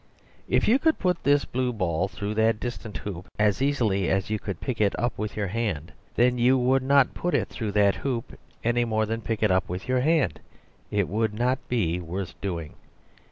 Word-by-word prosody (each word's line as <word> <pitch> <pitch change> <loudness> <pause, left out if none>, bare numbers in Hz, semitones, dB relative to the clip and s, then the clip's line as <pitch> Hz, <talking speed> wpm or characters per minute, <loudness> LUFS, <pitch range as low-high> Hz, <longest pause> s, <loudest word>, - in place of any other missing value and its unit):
If - - +2
you 250 +5 +5
could 320 +1 +2
put 180 -2 0
this 145 0 +3
blue 125 0 -1
ball 90 -4 0
through 100 +1 -4
that 110 0 +2
distant 115 -3 -5
hoop 95 -3 -7
as 105 +2 +2
easily 110 -10 +1
as 95 +2 0
you 110 - 0
could 100 -4 -5
pick 125 -5 -3
it 100 -2 +2
up 120 0 -1
with 105 0 -4
your 105 - 0
hand, 95 -7 -2 0.2
then 125 +1 +3
you 125 +2 +5
would 130 +1 +3
not 135 0 +4
put 175 - -1
it - - 0
through 110 -4 -4
that 100 -1 +3
hoop 125 -4 -3 0.3
any 120 +1 +2
more 110 -2 +1
than 115 +1 -2
you - - -16
pick 110 -1 -1
it 105 - +4
up 95 0 +1
with 90 +1 -5
your 130 0 +2
hand; 155 +1 +2 0.5
it 100 -3 +1
would 110 +2 -1
not 125 +4 +1
be 90 -8 0
worth 90 +1 -5
doing. 85 -6 -4
110 Hz, 210 wpm, -26 LUFS, 100-125 Hz, 0.5 s, you